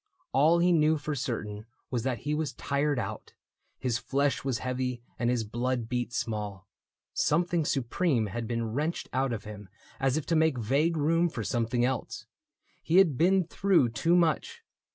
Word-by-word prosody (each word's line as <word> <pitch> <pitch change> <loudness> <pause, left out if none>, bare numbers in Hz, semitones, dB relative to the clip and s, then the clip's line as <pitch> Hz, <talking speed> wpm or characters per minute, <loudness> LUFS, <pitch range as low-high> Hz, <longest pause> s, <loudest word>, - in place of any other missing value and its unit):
All 155 +5 +5
he 175 +1 +3
knew 155 -1 +4
For 150 +1 -4
certain 110 -5 -4 0.2
was 120 -3 0
that 125 0 -2
he 150 - -2
was 150 -1 -1
tired 140 0 0
out: 110 -2 -5 0.4
His 120 -2 -1
flesh 140 0 0
was 135 -3 0
heavy 125 0 -3 0.2
and 120 - +1
his 120 -2 +1
blood 120 +2 -2
beat 120 0 -2
small; 105 -6 -4 0.5
Something 170 +1 +1
supreme 135 -1 +1
had 115 +3 -4
been 115 -1 -2
wrenched 155 +6 -2
out 130 0 +1
of 110 -3 -4
him 105 -2 -9 0.3
As 135 +1 +1
if 155 - -3
to 165 - 0
make 160 -4 +3
vague 140 +9 +1
room 165 +3 +2
for 115 -8 -5
something 120 +3 0
else. 130 -2 -3 0.6
He 170 - +2
had 180 -8 +5
been 185 +6 +3
through 175 -6 +2
too 140 +10 +2
much. 180 - +1
130 Hz, 175 wpm, -29 LUFS, 115-160 Hz, 0.6 s, All